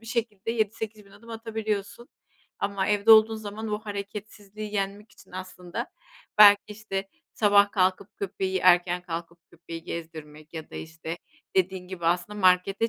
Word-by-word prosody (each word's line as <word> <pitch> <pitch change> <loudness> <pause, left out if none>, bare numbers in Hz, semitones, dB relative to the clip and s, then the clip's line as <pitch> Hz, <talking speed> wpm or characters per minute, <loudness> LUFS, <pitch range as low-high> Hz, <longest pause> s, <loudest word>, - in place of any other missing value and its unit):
bir 225 - -16
şekilde 225 -3 -2
7-8000 220 -2 -3
adım 230 +4 -15
atabiliyorsun. 220 0 -4 0.5
Ama 200 -1 -1
evde 210 +1 +3
olduğun 220 0 +8
zaman 215 +1 -6
o 210 - 0
hareketsizliği 205 0 -7
yenmek 200 +2 -3
için - - -19
aslında 185 -1 -6 0.5
belki, 205 -1 +9
işte, 195 -2 -4 0.2
sabah 205 -1 +5
kalkıp, 185 +1 +1
köpeği 190 -1 -2
erken 180 -1 +4
kalkıp 170 -1 -6
köpeği 165 0 -9
gezdirmek 155 -2 -8
ya 160 -1 -7
da, - - -12
işte, 160 +1 -6 0.4
dediğin 185 0 +1
gibi 175 -3 -5
aslında 180 +5 0
markete 185 +4 +3
200 Hz, 140 wpm, -27 LUFS, 180-215 Hz, 0.5 s, belki